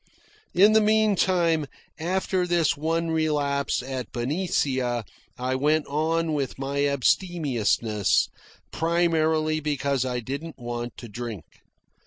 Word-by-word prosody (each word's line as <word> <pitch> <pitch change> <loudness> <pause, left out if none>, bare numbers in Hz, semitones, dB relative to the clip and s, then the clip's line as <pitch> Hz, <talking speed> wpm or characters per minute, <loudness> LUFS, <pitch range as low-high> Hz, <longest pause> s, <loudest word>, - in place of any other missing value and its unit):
In 205 +4 +6
the 220 - +6
meantime, 185 -7 +2 0.3
after 185 +2 0
this 170 -3 +2
one 165 +2 -1
relapse 145 -4 0
at 130 -3 -5
Benicia, 130 - -1 0.3
I 125 +1 -1
went 150 +3 +2
on 160 +2 0
with 140 -3 -2
my 140 +1 0
abstemiousness, 130 - +1 0.4
primarily 160 -2 +1
because 140 -3 0
I 125 -1 -2
didn't 140 +7 -6
want 120 -1 -5
to 120 - -8
drink. 110 -6 -6
150 Hz, 110 wpm, -25 LUFS, 130-165 Hz, 0.4 s, In